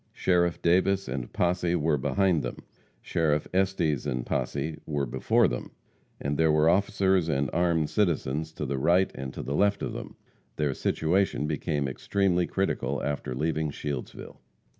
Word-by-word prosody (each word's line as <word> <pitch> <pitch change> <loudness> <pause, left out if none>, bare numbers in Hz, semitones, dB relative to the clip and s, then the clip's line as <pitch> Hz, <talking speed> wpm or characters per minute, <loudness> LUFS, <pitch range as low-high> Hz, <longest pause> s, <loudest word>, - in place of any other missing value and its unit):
Sheriff 85 -2 +1
Davis 95 +3 +3
and 65 -3 -4
posse 90 0 +1
were 80 -3 +1
behind 95 +2 +2
them; 60 -1 -5 0.5
Sheriff 75 -2 0
Estes 95 -6 +1
and 60 -1 -2
posse 80 0 -2
were 70 -2 -1
before 65 +1 +2
them, - - -4 0.5
and 70 0 -2
there 80 -1 +4
were 75 +1 +4
officers 95 -3 +2
and 70 -3 0
armed 85 -2 +2
citizens 80 -6 0
to 75 - -4
the 70 0 -2
right 90 +6 +3
and 65 0 -6
to - - -5
the 70 - -3
left 100 +5 +2
of - - -3
them. - - -7 0.4
Their 75 -3 0
situation 85 +4 0
became 75 -1 -1
extremely 90 +6 0
critical 95 0 -1
after 70 -3 -3
leaving 80 +2 -1
Shieldsville. 70 -2 -6
80 Hz, 155 wpm, -27 LUFS, 70-90 Hz, 0.5 s, there